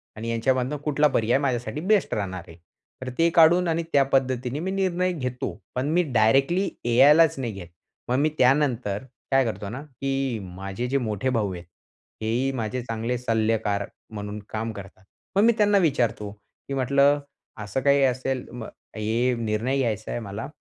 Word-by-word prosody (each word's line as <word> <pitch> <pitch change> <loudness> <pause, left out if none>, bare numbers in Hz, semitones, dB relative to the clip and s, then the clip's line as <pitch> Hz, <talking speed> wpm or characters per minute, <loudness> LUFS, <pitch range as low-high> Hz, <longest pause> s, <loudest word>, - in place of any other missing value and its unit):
आणि 115 +2 -5
यांच्यामधनं 130 +4 0
कुठला 150 0 +3
पर्याय 115 +3 +2
माझ्यासाठी 130 +2 -2
बेस्ट 200 +1 +2
राहणार 95 -4 -3
आहे. 80 - -13 0.4
तर 130 - -4
ते 165 0 +4
काढून 170 +2 +6
आणि 165 0 0
त्या 140 -1 +6
पद्धतीने 130 0 0
मी 190 +3 -2
निर्णय 185 -1 0
घेतो, 125 -5 -3 0.2
पण 130 +3 -1
मी 175 +2 +3
डायरेक्टली 135 - +3 0.2
ए-आयलाच 145 +7 +6
नाही 120 -4 -2
घेत. 90 -3 -9 0.4
मग 125 - +2
मी 155 +2 +3
त्यानंतर 125 -6 +2 0.3
काय 135 -1 +4
करतो 105 -3 -4
ना, 130 +6 -6
की 135 -3 -3
माझे 95 +6 -5
जे 140 +2 +1
मोठे 110 0 -1
भाऊ 105 -6 0
आहेत, 85 0 -8 0.6
हेही 120 +5 0
माझे 115 +2 -3
चांगले 115 +1 -2
सल्लागार 110 -4 0 0.3
म्हणून 105 0 -5
काम 110 +1 -3
करतात. 95 -2 -11 0.3
मग 200 - +4
मी 235 - +5
त्यांना 205 -1 +4
विचारतो, 120 - +1 0.4
की 140 - -4
म्हटलं 140 +2 +3 0.4
असं 105 +6 -3
काही 140 0 +4
असेल 130 0 0
"म 120 -2 -7 0.3
हे 115 +4 +1
निर्णय 115 +4 -1
घ्यायचा 110 -4 -1
आहे 120 - -2
मला, 105 +4 -6
125 Hz, 165 wpm, -25 LUFS, 110-140 Hz, 0.6 s, काढून